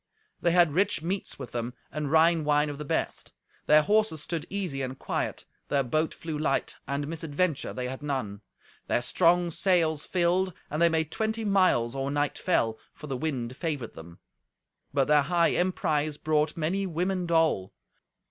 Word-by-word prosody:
They 175 Hz, -, +3 dB
had 170 Hz, -3 st, +4 dB
rich 185 Hz, -2 st, +1 dB
meats 185 Hz, +3 st, -3 dB
with 130 Hz, -4 st, -8 dB
them, 120 Hz, +1 st, -4 dB, 0.2 s
and 150 Hz, -2 st, -3 dB
Rhine 160 Hz, 0 st, +4 dB
wine 150 Hz, 0 st, +2 dB
of 145 Hz, -, -8 dB
the -, -, -4 dB
best. -, -, -2 dB, 0.3 s
Their 150 Hz, 0 st, +6 dB
horses 210 Hz, -3 st, +2 dB
stood 160 Hz, +1 st, -4 dB
easy 180 Hz, -9 st, -2 dB
and 130 Hz, 0 st, -4 dB
quiet; -, -, -3 dB, 0.2 s
their 140 Hz, -1 st, +1 dB
boat 155 Hz, +6 st, 0 dB
flew 160 Hz, -2 st, -5 dB
light, 135 Hz, -3 st, 0 dB
and 140 Hz, +1 st, -2 dB
misadventure 160 Hz, 0 st, -1 dB
they 125 Hz, -1 st, -4 dB
had 130 Hz, +2 st, -6 dB
none. 130 Hz, -9 st, -3 dB, 0.5 s
Their 120 Hz, -, +1 dB
strong 175 Hz, +6 st, +3 dB
sails 165 Hz, -4 st, +2 dB
filled, 180 Hz, +1 st, +1 dB, 0.2 s
and 150 Hz, +3 st, -1 dB
they 170 Hz, -, +6 dB
made 160 Hz, -1 st, 0 dB
twenty 220 Hz, 0 st, -2 dB
miles 185 Hz, -, +3 dB
or 135 Hz, 0 st, -2 dB
night 145 Hz, 0 st, -1 dB
fell, 115 Hz, -11 st, +1 dB, 0.2 s
for -, -, -10 dB
the 135 Hz, -3 st, -3 dB
wind 130 Hz, -3 st, -3 dB
favoured 145 Hz, -7 st, -3 dB
them. 85 Hz, +1 st, -11 dB, 0.7 s
But 135 Hz, -1 st, +2 dB
their 150 Hz, -1 st, +5 dB
high 170 Hz, +3 st, +2 dB
emprise 155 Hz, -5 st, 0 dB
brought 155 Hz, 0 st, 0 dB
many 185 Hz, +5 st, 0 dB
women 180 Hz, +1 st, -1 dB
dole. 160 Hz, -, +2 dB
155 Hz, 170 wpm, -28 LUFS, 140-175 Hz, 0.7 s, Their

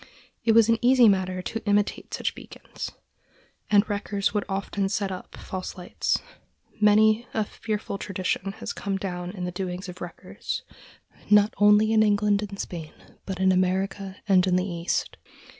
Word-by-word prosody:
It 225 Hz, -, +4 dB
was 225 Hz, -1 st, +6 dB
an 230 Hz, -1 st, +3 dB
easy 250 Hz, -1 st, +6 dB
matter 185 Hz, -2 st, +1 dB
to 225 Hz, +3 st, -4 dB
imitate 205 Hz, 0 st, +1 dB
such -, -, -2 dB
beacons, -, -, -8 dB, 0.8 s
and 205 Hz, 0 st, +4 dB
wreckers 205 Hz, -1 st, -1 dB
would 210 Hz, -1 st, 0 dB
often 195 Hz, 0 st, -1 dB
set 195 Hz, 0 st, -1 dB
up 185 Hz, -, -8 dB
false 185 Hz, 0 st, -6 dB
lights. 180 Hz, -1 st, -1 dB, 0.6 s
Many 215 Hz, +2 st, +4 dB
a 220 Hz, -, +2 dB
fearful 210 Hz, -1 st, -4 dB
tradition 195 Hz, 0 st, -2 dB
has 220 Hz, -, -6 dB
come 195 Hz, -1 st, -3 dB
down 180 Hz, -2 st, -4 dB
of 180 Hz, -, -3 dB
the 180 Hz, -, -3 dB
doings 180 Hz, 0 st, -4 dB
of 180 Hz, 0 st, -9 dB
wreckers, 175 Hz, -1 st, -6 dB, 0.7 s
not 210 Hz, 0 st, +5 dB
only 210 Hz, +2 st, +5 dB
in 220 Hz, -, +5 dB
England 205 Hz, -1 st, +3 dB
and 200 Hz, -1 st, -6 dB
Spain, 160 Hz, -3 st, -6 dB, 0.3 s
but 190 Hz, -2 st, -4 dB
in 190 Hz, 0 st, +4 dB
America 190 Hz, +1 st, 0 dB
and 190 Hz, -2 st, +4 dB
in 180 Hz, -, +3 dB
the 185 Hz, 0 st, +1 dB
East. 170 Hz, -2 st, -2 dB
200 Hz, 160 wpm, -26 LUFS, 185-210 Hz, 0.8 s, was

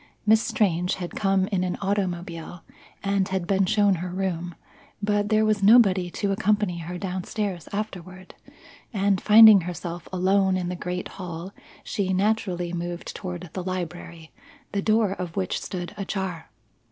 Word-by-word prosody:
Miss 220 Hz, +1 st, +5 dB
Strange 180 Hz, -5 st, 0 dB
had 175 Hz, -2 st, -6 dB
come 195 Hz, -2 st, +2 dB
in 190 Hz, -3 st, 0 dB
an 180 Hz, -1 st, -2 dB
automobile 175 Hz, -4 st, -3 dB, 0.4 s
and 200 Hz, -1 st, +1 dB
had 190 Hz, -2 st, -2 dB
been 195 Hz, 0 st, +2 dB
shown 205 Hz, 0 st, +3 dB
her 180 Hz, -, -4 dB
room; 175 Hz, -2 st, -3 dB, 0.4 s
but 205 Hz, 0 st, 0 dB
there 215 Hz, 0 st, +3 dB
was 215 Hz, -1 st, +1 dB
nobody 195 Hz, -4 st, +5 dB
to 200 Hz, +3 st, -2 dB
accompany 205 Hz, -3 st, +1 dB
her 175 Hz, +2 st, -6 dB
down 185 Hz, 0 st, -4 dB
stairs 195 Hz, -6 st, -4 dB
afterward, 185 Hz, -3 st, -6 dB, 0.6 s
and, 200 Hz, -3 st, +1 dB
finding 215 Hz, -2 st, +9 dB
herself 175 Hz, 0 st, -6 dB
alone 190 Hz, +1 st, +2 dB
in 180 Hz, -1 st, -2 dB
the 180 Hz, -, -3 dB
great 180 Hz, +1 st, -4 dB
hall, 180 Hz, 0 st, -7 dB, 0.3 s
she 190 Hz, -2 st, -1 dB
naturally 185 Hz, -3 st, 0 dB
moved 175 Hz, 0 st, -5 dB
toward 180 Hz, -3 st, -6 dB
the 185 Hz, -, -4 dB
library, 175 Hz, -3 st, -6 dB, 0.4 s
the 200 Hz, -, -1 dB
door 215 Hz, -1 st, +2 dB
of 180 Hz, -4 st, -5 dB
which 190 Hz, -2 st, -2 dB
stood 175 Hz, -1 st, -5 dB
ajar. 190 Hz, -, -4 dB
185 Hz, 155 wpm, -25 LUFS, 175-200 Hz, 0.6 s, finding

